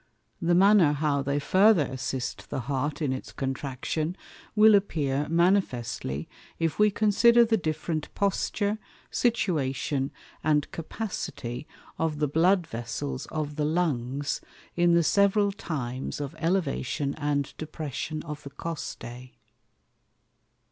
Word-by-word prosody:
The 175 0 +3
manner 190 -5 +6
how 145 -1 +1
they 140 +1 -1
farther 185 +3 +5
assist 130 -1 -4
the 130 - -2
Heart 140 +4 -2
in 135 -3 +1
its 130 - -6
Contraction, 135 +5 -3 0.4
will 215 0 +7
appear 150 -8 +1
manifestly, 125 - +1 0.3
if 165 +1 -1
we 210 0 +6
consider 230 +3 +5
the 225 0 +2
different 155 -3 -2
Posture, 205 +1 0 0.3
Situation, 145 - 0 0.3
and 150 -1 +2
Capacity 155 - -5 0.3
of 160 -2 0
the 150 0 +1
Blood 175 +5 +3
Vessels 130 0 -4
of 150 -1 -4
the 150 - +1
Lungs 145 -4 -1 0.3
in 175 0 +4
the 170 - +4
several 200 +3 +3
times 135 -11 -4
of 145 0 -4
Elevation 155 -5 0
and 145 -2 -1
Depression 155 0 -4
of 150 -2 -6
the 140 - -8
Costæ. 130 -4 -7
155 Hz, 120 wpm, -27 LUFS, 135-180 Hz, 0.4 s, will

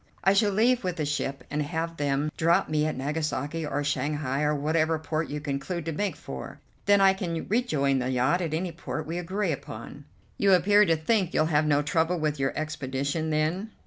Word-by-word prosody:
I 195 - +5
shall 205 +1 +3
leave 235 +4 +3
with 180 -2 -1
the 155 -4 -2
ship, 140 -2 -2
and 150 +1 0
have 165 +2 -3
them 145 +1 0
drop 170 +4 +3
me 155 0 +1
at 155 - -3
Nagasaki 150 +2 -2
or 145 0 -1
Shanghai, 145 -1 -1
or 150 0 +2
whatever 155 +2 +1
port 155 0 -3
we 150 - -3
conclude 145 +4 -3
to 165 - -2
make 200 +6 -2
for. - - -8 0.3
Then 205 0 +6
I 195 -1 +6
can 170 -4 -4
rejoin 150 - +1
the 125 0 -1
yacht 130 +8 +2
at 160 -3 -1
any 175 +2 -2
port 155 -2 -5
we 170 +3 -3
agree 185 +1 -1
upon." 140 +1 -7 0.3
"You 200 -1 +5
appear 205 +4 +5
to 165 -3 +3
think 185 +3 0
you'll 155 - +4
have 150 +1 +3
no 145 -1 +3
trouble 165 +4 +1
with 150 -2 -1
your 135 0 +1
expedition, 145 +1 -2
then?" 160 +7 0
155 Hz, 205 wpm, -27 LUFS, 145-180 Hz, 0.3 s, Then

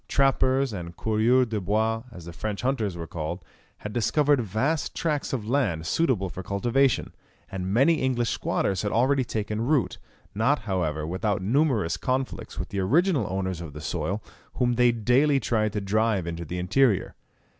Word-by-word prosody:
Trappers, 135 -2 +2
and 85 -3 -7
coureurs 115 +4 +3
des 110 -1 -2
bois, 110 +4 0
as 90 -7 -11
the 85 - -8
French 105 +4 -4
hunters 110 -9 -1
were 85 - -5
called, 80 +2 -5 0.3
had 105 - -7
discovered 145 +4 +2
vast 130 - -1
tracts 150 -3 -1
of 115 -6 -3
land 110 - 0
suitable 120 - +1
for 95 - -7
cultivation, 120 +8 +1 0.4
and 95 0 -3
many 140 +9 +3
English 120 -3 0
squatters 95 -3 -1
had 105 - -2
already 130 +3 +2
taken 110 -2 -3
root, 135 +2 +1 0.3
not, 115 +8 +2
however, 85 -7 -1
without 95 +3 -1
numerous 115 - +1
conflicts 130 0 -3
with - - -4
the 100 - -3
original 140 - +2
owners 95 -2 -2
of 80 -4 -8
the 75 - -8
soil, 85 +7 -3 0.3
whom 125 -2 +1
they 120 0 +4
daily 125 +6 +3
tried 110 -3 0
to 105 - -1
drive 105 -1 +1
into 85 0 -5
the 85 +4 -5
interior. 100 +4 +2
110 Hz, 165 wpm, -26 LUFS, 95-130 Hz, 0.4 s, they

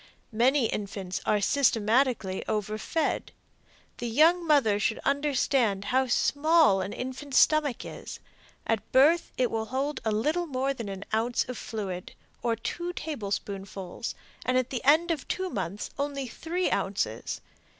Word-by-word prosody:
Many 250 +4 +3
infants 195 -3 -3
are 210 - +3
systematically 225 -3 +2
overfed. 215 +9 -1 0.7
The 240 - -4
young 330 +8 +4
mother 260 -9 +4
should 220 +2 +1
understand 270 -7 +1
how 260 0 +3
small 290 - +4
an 190 - -4
infant's 260 +3 -4
stomach 300 -5 +3
is. - - -8 0.5
At 220 -2 -1
birth 305 +6 +4
it 250 -2 +1
will 225 -1 -1
hold 270 +5 -2
a 220 - 0
little 305 +11 0
more 270 -1 0
than 230 -6 -6
an 195 0 -6
ounce 230 +2 +1
of 250 - -5
fluid, 195 -7 -5 0.3
or 235 -1 +1
two 345 +10 -4
tablespoonfuls, 200 - -5 0.3
and 255 0 +1
at 255 0 0
the 255 - -3
end 315 +5 +5
of 310 -5 -3
two 375 -1 -2
months 195 +1 -4
only 280 -2 -2
three 340 +9 -2
ounces. 115 - -2
250 Hz, 140 wpm, -28 LUFS, 210-290 Hz, 0.7 s, end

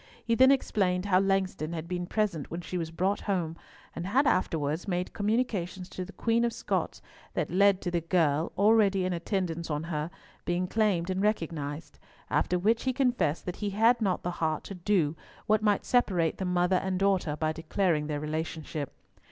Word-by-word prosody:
He 230 - +1
then 260 +3 +6
explained 195 -9 +1
how 185 -2 +4
Langston 190 -4 0
had 165 0 -5
been 175 0 -3
present 195 -8 -1
when 170 +2 -5
she 180 - -7
was 165 -2 -2
brought 185 +5 0
home, 170 -4 0 0.4
and 170 - -4
had 260 +8 +3
afterwards 160 - 0
made 180 -1 -2
communications 205 -5 -1
to 185 - -5
the 185 - -9
Queen 230 +2 +1
of 235 - +1
Scots - - -2 0.3
that - - -1
led 200 +1 +4
to 175 - -2
the 170 -1 0
girl, 165 -2 +1
already 200 -2 +4
in 185 - 0
attendance 170 -2 -2
on 150 0 -2
her, 150 +1 -2 0.3
being 175 +1 0
claimed 190 -3 +1
and 185 +1 -1
recognised; 165 -7 -2 0.3
after 180 - +2
which 220 +7 +1
he 260 - +1
confessed 245 - +1
that 180 - -4
he 205 - -2
had 225 +4 +3
not 190 -4 0
the 175 - -1
heart 155 -1 0
to - - -7
do 175 -4 +1 0.3
what 215 0 +3
might 210 -2 +2
separate 185 -10 +2
the 190 - -1
mother 180 +1 +2
and 190 0 -1
daughter 190 -6 +1
by 155 +1 0
declaring 165 -1 0
their 150 -1 -2
relationship. 155 -1 -4
180 Hz, 185 wpm, -29 LUFS, 165-205 Hz, 0.4 s, then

